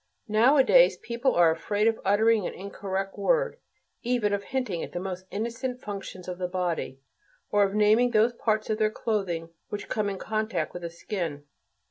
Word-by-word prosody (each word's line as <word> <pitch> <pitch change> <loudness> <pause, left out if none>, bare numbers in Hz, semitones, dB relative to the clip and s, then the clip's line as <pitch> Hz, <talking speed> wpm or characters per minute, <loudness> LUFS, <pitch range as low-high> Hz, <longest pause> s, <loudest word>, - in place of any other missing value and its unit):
Nowadays 265 - +5
people 240 +2 -1
are 170 -2 +6
afraid 205 +6 -1
of 225 0 +2
uttering 215 +1 +3
an - - -7
incorrect 195 0 -4
word, - - +1 0.4
even 235 -4 0
of 200 0 -2
hinting 245 -10 -2
at - - -7
the 175 - -2
most 185 0 -6
innocent 235 +4 -3
functions 195 -4 -7
of 180 0 -5
the 180 - -1
body, 175 -7 -2 0.5
or 205 - +3
of 200 0 +2
naming 215 +4 +4
those 230 +1 +3
parts 215 -2 -1
of 215 - -1
their 215 -1 +3
clothing 195 -7 -2 0.2
which 205 - -6
come 210 -2 0
in 195 - -4
contact 220 +2 -2
with 175 - -6
the 170 - -4
skin. 170 -4 -4
210 Hz, 175 wpm, -27 LUFS, 185-230 Hz, 0.5 s, are